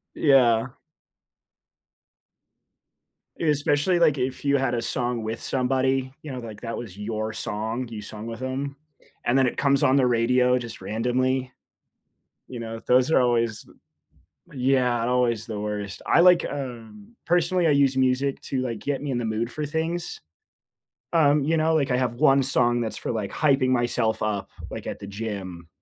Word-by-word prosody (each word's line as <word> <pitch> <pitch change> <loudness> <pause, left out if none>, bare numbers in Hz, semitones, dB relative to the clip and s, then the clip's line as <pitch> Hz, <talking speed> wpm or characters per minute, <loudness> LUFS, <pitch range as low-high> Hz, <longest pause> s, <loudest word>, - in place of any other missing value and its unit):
Yeah. 125 -4 +4 2.7
Especially, 150 +2 +2
like, 155 -4 +3
if 130 +2 -3
you 140 0 +3
had 130 -2 0
a 115 - 0
song 120 -1 -2
with 110 +1 -4
somebody, 130 0 0
you 150 - -8
know, 130 - -5
like, 110 -3 -9
that 115 -1 -4
was 105 -6 -8
your 110 +1 -3
song, 110 +4 -4
you 110 -2 -7
sung 105 +1 -8
with 115 +2 -7
them, 135 +2 -3 0.5
and 120 +3 +2
then 130 - +4
it - - -2
comes 140 0 +2
on 135 -1 +4
the 130 -2 +4
radio, 125 +1 +3
just 115 -1 -8
randomly. 125 +3 -1 1.0
You 125 -2 -7
know, 115 0 -6
those 125 +3 +4
are 145 - +5
always 115 -3 +1
th - - -20 0.8
Yeah, 125 -3 +1
always 120 -3 +1
the 105 -3 -5
worst. 105 -2 -5
I - - +4
like, 180 -1 +6
um, 140 - -8
personally, 175 0 +2
I - - +4
use 140 -2 +3
music 130 +1 +1
to, 130 - -2
like, 115 -3 -3
get 145 0 -3
me 145 - -3
in 125 - -1
the 120 - -3
mood 110 +2 -2
for 150 -1 -3
things. 160 +3 -3 0.9
Um, 150 -3 +4
you 165 +2 +1
know, 160 +1 +2
like, 145 -4 +1
I - - +2
have 125 -2 0
1 135 0 +4
song 120 -2 +2
that's 110 -2 -2
for, - - -3
like, 110 -3 -3
hyping 135 -4 +2
myself 120 -3 +1
up, 105 -2 -2 0.2
like, - - -7
at - - -5
the 100 - -9
gym. 100 -5 -6
125 Hz, 170 wpm, -25 LUFS, 115-140 Hz, 2.7 s, like